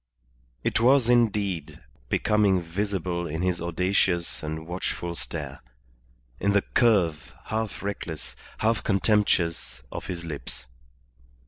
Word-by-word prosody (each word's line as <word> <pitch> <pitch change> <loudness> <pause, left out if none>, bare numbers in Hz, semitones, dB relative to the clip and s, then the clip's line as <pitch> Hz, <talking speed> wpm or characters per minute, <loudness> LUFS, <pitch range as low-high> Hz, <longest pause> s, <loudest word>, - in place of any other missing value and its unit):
It - - +1
was, 125 +1 +5
indeed, 105 -9 +1 0.3
becoming 105 -3 +3
visible 90 0 -2
in 80 +3 -3
his 90 -2 0
audacious 85 0 +1
and 80 +1 -4
watchful 85 0 -3
stare, - - -5 0.8
in 100 0 +2
the 100 - +4
curve, 95 - +2
half 110 -2 -3
reckless, 85 -6 -4 0.2
half 110 -1 +1
contemptuous, 90 - +1
of - - -6
his 85 -2 -5
lips. 75 -4 -6
95 Hz, 110 wpm, -26 LUFS, 85-105 Hz, 0.8 s, was